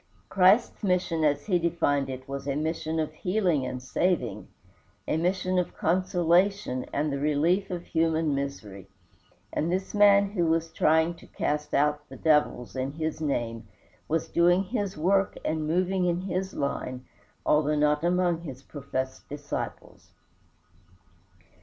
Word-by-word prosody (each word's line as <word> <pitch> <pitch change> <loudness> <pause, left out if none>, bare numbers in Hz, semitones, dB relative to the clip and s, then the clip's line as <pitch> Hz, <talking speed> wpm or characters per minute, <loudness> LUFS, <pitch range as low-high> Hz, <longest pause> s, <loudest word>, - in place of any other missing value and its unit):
Christ's 195 +5 +4
mission 180 -4 +1
as 145 -2 +1
he 180 -4 +2
defined 145 -5 0
it 130 0 -7
was 140 0 -5
a 140 - 0
mission 160 +1 -2
of 155 -1 -2
healing 180 -6 0
and 125 0 -5
saving, 180 +7 -1 0.6
a - - +1
mission 185 +2 0
of 180 - -3
consolation 180 -3 +1
and 150 0 -1
the 140 - -2
relief 155 +7 +1
of 175 -2 -4
human 160 -2 +1
misery; 125 -9 -5 0.7
and 165 +3 0
this 190 +1 -2
man 200 -1 +5
who 175 -5 0
was 165 0 0
trying 160 +2 +3
to - - -16
cast 150 0 -2
out 150 +1 +1
the - - -10
devils 150 -6 +1
in 130 +1 -2
his 160 0 -3
name 115 -7 -2 0.4
was 160 +1 -1
doing 175 +2 +3
his 200 -3 -3
work 190 +4 +1
and 155 -1 -1
moving 185 +3 +1
in 175 0 0
his 190 0 -3
line, 130 -2 -3 0.4
although 150 0 +3
not 150 +1 +2
among 175 -1 +1
his 135 -5 -9
professed 130 -2 -5
disciples. 145 0 -6
160 Hz, 145 wpm, -27 LUFS, 145-180 Hz, 0.7 s, man